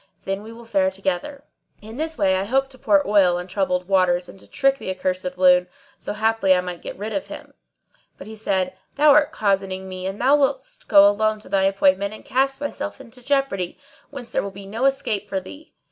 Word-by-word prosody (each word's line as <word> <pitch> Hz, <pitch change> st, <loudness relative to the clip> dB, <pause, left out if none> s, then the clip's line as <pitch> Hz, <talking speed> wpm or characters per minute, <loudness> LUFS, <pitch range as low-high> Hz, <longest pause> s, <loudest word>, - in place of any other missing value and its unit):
Then 195 Hz, +1 st, -2 dB
we 220 Hz, +2 st, -10 dB
will 235 Hz, +1 st, -12 dB
fare 195 Hz, -4 st, +1 dB
together." 195 Hz, +9 st, -4 dB, 0.4 s
In 220 Hz, +3 st, -11 dB
this 320 Hz, +1 st, -3 dB
way 190 Hz, -1 st, +2 dB
I 190 Hz, +1 st, -1 dB
hoped 270 Hz, +4 st, 0 dB
to 260 Hz, -, -15 dB
pour 205 Hz, -7 st, +2 dB
oil 195 Hz, -4 st, +4 dB
on 180 Hz, -, -5 dB
troubled 180 Hz, -1 st, -1 dB
waters 180 Hz, -2 st, +2 dB
and 190 Hz, -, -13 dB
to -, -, -16 dB
trick 275 Hz, -1 st, +1 dB
the -, -, -6 dB
accursed 185 Hz, -1 st, -3 dB
loon, 180 Hz, -1 st, +5 dB, 0.3 s
so -, -, -5 dB
haply 215 Hz, -3 st, +2 dB
I 180 Hz, -, +1 dB
might 180 Hz, -1 st, -7 dB
get -, -, -7 dB
quit 210 Hz, +3 st, -5 dB
of 295 Hz, -, -3 dB
him; -, -, -10 dB, 0.6 s
but -, -, -10 dB
he 220 Hz, -, -9 dB
said, 190 Hz, -4 st, -1 dB, 0.2 s
"Thou 295 Hz, +1 st, +5 dB
art 295 Hz, +1 st, +4 dB
cozening 195 Hz, -5 st, -1 dB
me 185 Hz, 0 st, -5 dB
and 195 Hz, +2 st, -5 dB
thou 270 Hz, +4 st, +4 dB
wouldst -, -, -2 dB
go 200 Hz, -1 st, +7 dB
alone 215 Hz, +1 st, +1 dB
to -, -, -13 dB
thy 195 Hz, -1 st, +2 dB
appointment 195 Hz, +1 st, +2 dB
and -, -, -15 dB
cast 270 Hz, +1 st, +1 dB
thyself 290 Hz, 0 st, -5 dB
into 250 Hz, -1 st, -13 dB
jeopardy, 270 Hz, -10 st, -1 dB, 0.3 s
whence 245 Hz, -5 st, -9 dB
there -, -, 0 dB
will 200 Hz, -, -5 dB
be 195 Hz, 0 st, -11 dB
no 225 Hz, +6 st, -2 dB
escape 220 Hz, -7 st, 0 dB
for 195 Hz, -, -1 dB
thee. 290 Hz, -, -13 dB
200 Hz, 220 wpm, -22 LUFS, 190-265 Hz, 0.6 s, go